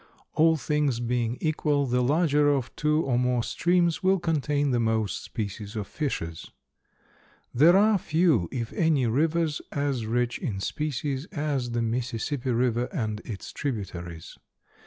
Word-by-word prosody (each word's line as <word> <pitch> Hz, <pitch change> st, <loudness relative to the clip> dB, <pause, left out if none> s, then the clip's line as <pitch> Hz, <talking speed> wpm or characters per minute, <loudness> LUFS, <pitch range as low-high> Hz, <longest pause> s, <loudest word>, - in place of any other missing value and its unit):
All 160 Hz, +1 st, +4 dB
things 150 Hz, -4 st, 0 dB
being 120 Hz, 0 st, -1 dB
equal, 150 Hz, -2 st, +1 dB
the 125 Hz, -1 st, +1 dB
larger 145 Hz, +2 st, +3 dB
of 135 Hz, -4 st, -1 dB
two 150 Hz, +1 st, +1 dB
or 125 Hz, -3 st, +1 dB
more 125 Hz, -1 st, +1 dB
streams 175 Hz, +2 st, +1 dB
will 190 Hz, 0 st, +3 dB
contain 145 Hz, -4 st, 0 dB
the 120 Hz, -, +2 dB
most 110 Hz, -4 st, 0 dB
species 105 Hz, -1 st, -5 dB
of 105 Hz, -2 st, -3 dB
fishes. 85 Hz, -, -4 dB, 1.0 s
There 165 Hz, +9 st, +6 dB
are 210 Hz, 0 st, +4 dB
few, 155 Hz, -, +2 dB
if 115 Hz, -3 st, -4 dB
any, 155 Hz, -6 st, +2 dB
rivers 155 Hz, +5 st, +1 dB
as 140 Hz, -6 st, -1 dB
rich 120 Hz, +1 st, 0 dB
in 110 Hz, -, -3 dB
species 145 Hz, +3 st, -2 dB
as 145 Hz, -6 st, -2 dB
the 120 Hz, 0 st, 0 dB
Mississippi 125 Hz, +3 st, -2 dB
river 120 Hz, 0 st, +1 dB
and 110 Hz, -, -2 dB
its 105 Hz, -4 st, -7 dB
tributaries. 90 Hz, -, -5 dB
130 Hz, 140 wpm, -26 LUFS, 115-150 Hz, 1.0 s, There